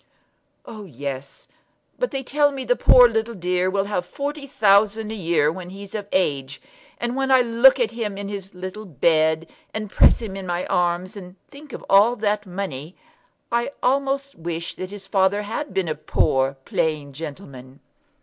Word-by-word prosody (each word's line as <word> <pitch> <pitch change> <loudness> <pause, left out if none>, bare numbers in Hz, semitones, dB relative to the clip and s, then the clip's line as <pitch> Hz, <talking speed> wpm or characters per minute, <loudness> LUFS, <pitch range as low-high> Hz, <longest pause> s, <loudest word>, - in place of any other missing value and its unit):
"Oh, 215 -2 -9
yes; 140 -3 -7 0.5
but - - 0
they 270 0 -4
tell 290 +2 +2
me 270 -2 -5
the - - +2
poor 250 - +7
little 225 0 -2
dear 180 0 0
will 195 +1 0
have 200 -3 -2
forty 280 +9 -5
thousand 210 -1 +3
a - - -4
year 165 -6 +1
when 180 +1 -8
he's 195 +1 -10
of 205 -2 -4
age; 140 -7 0 0.4
and 240 +1 -3
when 270 0 -1
I 260 -1 +6
look 240 +3 +5
at 230 -3 +1
him 220 -4 -4
in 200 0 -5
his 195 -2 -7
little 185 +4 -7
bed, 160 - +2 0.3
and 215 -2 -4
press - - +5
him 215 -4 -6
in 195 -1 -6
my 175 +1 -2
arms, 175 +2 0
and 180 -2 -10 0.2
think 290 0 -13
of - - -8
all 205 +5 +5
that 210 -2 -1
money, 180 -4 -5 0.6
I 235 +4 0
almost 275 +1 0
wish 170 0 -5
that 185 - -6
his 200 -1 -10
father 195 +1 +2
had 230 +8 -4
been 190 -2 -1
a 155 - 0
poor 135 -2 0
plain 150 -3 -1
gentleman." 140 -4 -9
195 Hz, 180 wpm, -22 LUFS, 170-230 Hz, 0.6 s, poor